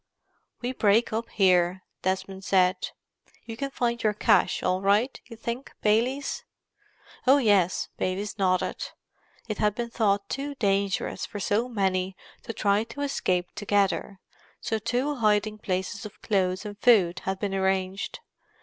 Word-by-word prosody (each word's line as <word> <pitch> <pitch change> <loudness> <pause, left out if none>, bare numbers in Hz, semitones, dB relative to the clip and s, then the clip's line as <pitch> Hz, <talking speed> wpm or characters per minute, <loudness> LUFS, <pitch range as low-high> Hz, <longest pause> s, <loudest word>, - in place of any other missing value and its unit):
"We 245 - 0
break 220 -2 +3
up 230 +1 -2
here," 185 -2 +3 0.2
Desmond 190 +1 -2
said. 185 -1 +2 0.6
"You 225 - -6
can 275 +4 -3
find 235 -3 -1
your 210 -1 +1
cache 185 - +3
all 185 +1 +1
right, 205 +7 +2
you 230 -2 -10
think, 235 +3 -5
Baylis?" 245 +6 +1 0.8
"Oh, 270 +2 +7
yes," 205 -8 +3
Baylis 200 +3 -2
nodded. 185 -1 +1 0.6
It 215 -2 -4
had 210 -1 +2
been 235 0 -4
thought 200 -3 +1
too 280 +4 -4
dangerous 200 -4 0
for 205 - -6
so 215 +5 0
many 190 -4 0 0.3
to - - -6
try 205 -1 +2
to 235 +5 -8
escape 185 -10 0
together, 200 -1 0 0.4
so 220 - -2
two 250 +6 -1
hiding 215 -1 +2
places 190 +1 -3
of 210 - -10
clothes 185 -1 0
and 205 0 -7
food 195 -9 +4
had 190 0 -1
been 200 0 -2
arranged. 190 0 -1
205 Hz, 145 wpm, -27 LUFS, 190-230 Hz, 0.8 s, Oh